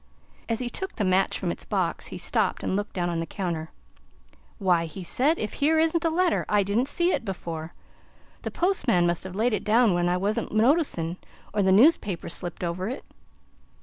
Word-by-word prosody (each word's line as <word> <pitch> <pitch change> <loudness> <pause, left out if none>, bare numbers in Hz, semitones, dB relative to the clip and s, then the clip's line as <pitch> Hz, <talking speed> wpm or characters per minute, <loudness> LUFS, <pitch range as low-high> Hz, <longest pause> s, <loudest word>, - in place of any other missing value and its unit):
As 230 - +1
he 250 - -3
took 380 +9 -5
the 215 - -1
match 185 +1 +2
from - - -2
its - - -6
box, - - -2
he - - -7
stopped - - 0
and - - -1
looked 205 +1 -3
down 175 -2 -1
on 170 -1 -1
the 165 - -3
counter. 165 -3 -3 0.9
"Why!" 180 -5 +2
he 165 +4 -8
said, 285 - +2
"if 215 - -3
here 310 +3 +2
isn't 325 +1 +2
a 330 - +3
letter! 350 +1 +1
I 205 -1 +3
didn't 215 +7 0
see 345 +5 +1
it - - -1
before. 170 -5 -6 0.7
The - - -4
postman 265 - +1
must 175 -1 0
have 190 -1 -7
laid 225 +3 +1
it 210 - -1
down 220 -1 +4
when 175 0 +1
I 180 - +1
wasn't 200 +3 -1
noticin', 215 - +2 0.4
or 210 - +1
the 190 -1 +3
newspaper 205 - +3
slipped 175 +1 -3
over 180 +4 -2
it." 260 - -6
205 Hz, 200 wpm, -26 LUFS, 175-255 Hz, 0.9 s, down